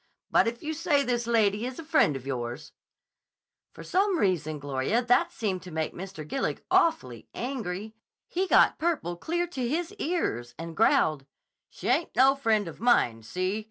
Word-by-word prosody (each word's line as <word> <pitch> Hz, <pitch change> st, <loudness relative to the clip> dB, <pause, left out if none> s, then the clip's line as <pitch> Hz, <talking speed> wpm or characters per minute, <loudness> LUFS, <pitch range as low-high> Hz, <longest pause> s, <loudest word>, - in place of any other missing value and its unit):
But -, -, +4 dB
if 235 Hz, +1 st, -4 dB
you 310 Hz, +1 st, -2 dB
say 300 Hz, -3 st, +1 dB
this 240 Hz, -2 st, -1 dB
lady 215 Hz, -2 st, +2 dB
is 255 Hz, +1 st, -4 dB
a 330 Hz, -, -7 dB
friend 305 Hz, -, +3 dB
of 135 Hz, -1 st, -7 dB
yours—' 120 Hz, -3 st, -5 dB, 1.0 s
"For -, -, -11 dB
some 385 Hz, 0 st, +1 dB
reason, 160 Hz, -, 0 dB
Gloria, 145 Hz, -, -1 dB
that 245 Hz, 0 st, +3 dB
seemed 195 Hz, -5 st, -2 dB
to 180 Hz, -, -10 dB
make 160 Hz, 0 st, -2 dB
Mr. 185 Hz, -4 st, -8 dB
Gillig 270 Hz, -, -2 dB
awfully 125 Hz, -, +1 dB
angry. 220 Hz, -5 st, -4 dB, 0.3 s
He 375 Hz, +2 st, -1 dB
got -, -, +4 dB
purple 310 Hz, -, -1 dB
clear 345 Hz, -, -1 dB
to 260 Hz, -9 st, -3 dB
his 340 Hz, +6 st, -2 dB
ears, 120 Hz, -, -2 dB
and 165 Hz, +1 st, -7 dB
growled, 150 Hz, -3 st, +2 dB, 0.4 s
'She -, -, -8 dB
ain't 335 Hz, -, +1 dB
no 265 Hz, +2 st, +6 dB
friend 220 Hz, -7 st, +1 dB
of 165 Hz, -, -9 dB
mine. 125 Hz, -, +3 dB
See? 185 Hz, -, -2 dB
220 Hz, 170 wpm, -27 LUFS, -, 1.0 s, no